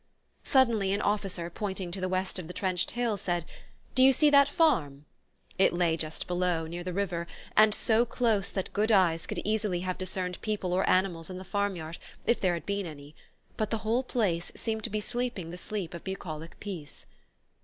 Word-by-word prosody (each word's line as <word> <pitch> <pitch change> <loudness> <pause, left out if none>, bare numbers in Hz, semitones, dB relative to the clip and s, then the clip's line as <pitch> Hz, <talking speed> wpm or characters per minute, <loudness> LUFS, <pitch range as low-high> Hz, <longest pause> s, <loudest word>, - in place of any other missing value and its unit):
Suddenly 230 -7 +3
an 200 - 0
officer, 195 -4 -1
pointing 190 -2 -4
to 190 +1 -5
the 185 - 0
west 185 0 -1
of 170 - -7
the 180 - -8
trenched 185 -2 0
hill 235 -4 +1
said: 175 -3 -1 0.5
"Do 260 - +3
you 265 +1 +8
see 295 +3 +4
that 280 0 +7
farm?" 155 - +2 0.5
It 190 - +5
lay 175 -2 +2
just 160 -1 -4
below, 175 -2 0
near 170 +2 -5
the 180 - -3
river, 175 -3 -2 0.3
and 215 0 +7
so 220 +2 +3
close 225 -4 +1
that 190 - -3
good 215 +2 +2
eyes 175 -5 +3
could - - -4
easily 210 -4 0
have 185 0 -3
discerned 185 -1 -3
people 205 -4 -1
or 185 +1 +2
animals 185 -3 +2
in 185 - -6
the 185 - -7
farm 200 +1 -1
yard, 160 -1 -7 0.3
if 235 - +2
there 180 -2 +2
had 170 -2 -6
been 200 -2 -1
any; 145 -1 -10 0.4
but 215 -1 0
the 225 - 0
whole 230 +3 +2
place 195 -10 -1
seemed 220 -1 -3
to - - -2
be 215 +1 -1
sleeping 235 -7 -3
the - - -6
sleep 195 -5 -4
of 170 - -7
bucolic 165 -4 -6
peace. 175 -8 -7
190 Hz, 200 wpm, -29 LUFS, 175-215 Hz, 0.5 s, you